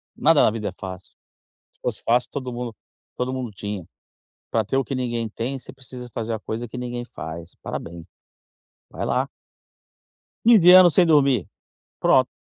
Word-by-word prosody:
Nada 160 -1 +5
na - - +4
vida 105 -2 -3
é - - -8
fácil. 95 0 -9 0.6
Se - - -38
fosse - - -3
fácil, 120 +2 +2
todo 130 -3 -5
mundo 120 -2 -5 0.4
todo 125 +1 -2
mundo 130 -3 -3
tinha. 100 -2 -5 0.7
Pra 110 -1 +1
ter 115 +6 -1
o 135 - +2
que 135 - -4
ninguém 120 -3 -2
tem, 120 +6 -4
você 125 - -12
precisa 125 -2 -10
fazer 115 +1 -3
a 110 - -3
coisa 115 +3 -5
que 120 - -8
ninguém 120 -1 -4
faz. 85 -6 -8
Parabéns. 85 0 -6 0.9
Vai - - -4
lá. - - 0 1.2
Fim 230 -2 +8
de 180 0 +8
ano 185 -1 +9
sem 180 +1 +5
dormir. 140 - +3 0.5
Pronto. - - +4
120 Hz, 175 wpm, -23 LUFS, 110-135 Hz, 1.2 s, ano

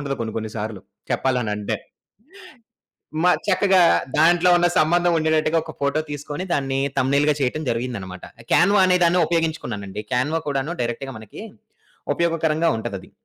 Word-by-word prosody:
ఉండదు 140 -1 -3
కొన్ని 110 -2 -4
కొన్ని 110 -1 -4
సార్లు, 105 -2 -5 0.3
చెప్పాలనంటే. 110 -6 -1 1.5
మ - - +3 0.2
చక్కగా 190 -1 +4 0.4
దాంట్లో 175 +3 +4
ఉన్న 175 0 +3
సంబంధం 175 +3 +3
ఉండేటట్టుగా 160 0 +1
ఒక 160 - -8
ఫోటో 140 +2 +1
తీసుకొని, 145 +4 -5
దాన్ని 135 -1 -1 0.2
థంబ్‌నెయిల్‌గా 140 +3 +2
చేయటం 135 +4 -1
జరిగిందన్నమాట. 115 -6 -5 0.3
క్యాన్వా 195 +3 +5
అనేదాన్ని 180 -1 +3
ఉపయోగించుకున్నానండి. 120 - -3
క్యాన్వా 145 +6 0
కూడాను 140 +3 -2
డైరెక్ట్‌గా 130 +3 -4
మనకి 110 - -11 0.7
ఉపయోగకరంగా 165 -1 +1
ఉంటదది. 110 -4 -6
145 Hz, 120 wpm, -22 LUFS, 120-165 Hz, 1.5 s, క్యాన్వా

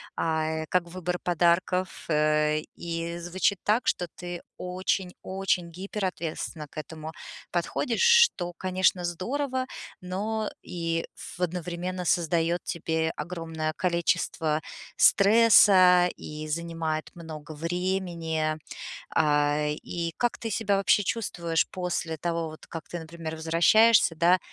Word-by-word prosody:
а, 160 0 -1
как 180 -1 +2
выбор 180 0 -3
подарков. 180 +2 +2 0.2
Э, 150 0 +2 0.2
и 170 0 -4
звучит 180 +2 0
так, 215 +4 +2
что 180 - +1
ты 175 -1 -6 0.2
очень-очень 185 -1 -2
гиперответственна 180 -5 -4
к 150 - -18
этому 155 0 -6 0.4
подходишь, - - -1
что, 470 - +5
конечно, 185 0 +1
здорово, 255 - -2 0.4
но 210 +4 -2
и 165 -1 -2
в - - -10
одновременно 180 +1 -3
создаёт 170 +1 +1
тебе 160 -1 -1
огромное 165 -3 -4
количество 170 -2 0 0.3
стресса 200 -4 +6
и 155 0 -7
занимает 160 -1 -3
много 155 -2 -8
времени. 165 -2 -1 0.6
А, 150 -1 +3
и 165 +2 -4
как 240 -1 0
ты 225 - -4
себя 200 -1 +1
вообще 200 +1 +3
чувствуешь 175 -6 -1
после 175 -3 -3
того, 165 0 -2
вот 155 - -12
как 165 -1 -7
ты, 175 - -5
например, 160 0 -7
возвращаешься, 170 +5 +5
да, 175 +3 +4
170 Hz, 115 wpm, -27 LUFS, 160-185 Hz, 0.6 s, стресса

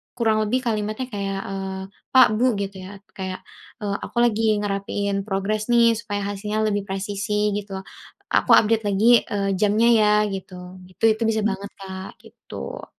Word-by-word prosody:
kurang 225 -3 +2
lebih 255 +4 0
kalimatnya 215 +1 -2
kayak, 195 -2 -3
eee, 195 -1 -5 0.3
"Pak, 255 -2 +9
Bu," 250 -2 +3
gitu 200 -1 -4
ya 200 0 -12
kayak, 185 -1 -6 0.4
eee, 200 -1 -1
"aku - - -9
lagi 220 -2 +2
ngerapiin 200 0 -2
progres 210 +2 -1
nih 235 -1 +5
supaya 205 -3 -4
hasilnya 210 +2 -2
lebih 205 -2 -1
presisi 205 +2 -1
gitu, 205 -1 -4 0.6
aku - - +2
update 220 0 +3
lagi, 220 +4 +4
eee, 200 -1 -1
jamnya 215 +2 +3
ya," 215 -2 +4 0.2
gitu 190 -1 -7 0.3
gitu. 185 +4 -21
Itu 220 - -12
bisa 220 -1 +1
banget, 200 -1 -2
Kak, 190 -1 -7
gitu. 65 - -9
205 Hz, 155 wpm, -23 LUFS, 195-220 Hz, 0.6 s, Pak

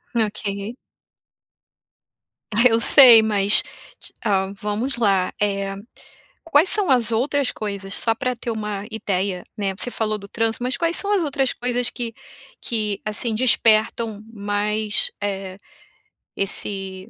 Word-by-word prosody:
OK. 210 0 -3 1.8
Ah, 235 +4 +5
eu 225 0 +1
sei, 240 -2 +8
mas, 205 -2 +5 0.6
ah, 195 -3 0
vamos 220 +6 -1
lá. 195 -5 +1
Eh, 200 -1 -2 0.7
quais 330 +2 +3
são 415 -4 +5
as 240 -3 +2
outras 270 +4 0
coisas 200 -2 -6
só 225 - 0
pra 255 0 -3
ter 235 0 -6
uma 210 -2 -5
ideia, 195 -4 -3
né? 195 -2 -2
Você 245 - 0
falou 215 -2 -2
do 200 - -12
trânsito, 225 +2 -3
mas 250 -1 -1
quais 335 +3 -1
são 405 - 0
as 395 - +1
outras 275 -3 -1
coisas 245 0 -1
que 235 -2 -6 0.5
que 210 -4 -3
assim 220 +2 -2
despertam 220 -2 +1
mais, 210 0 -1
eh, 195 -2 -5 0.8
esse 195 0 -3
215 Hz, 130 wpm, -21 LUFS, 200-240 Hz, 1.8 s, sei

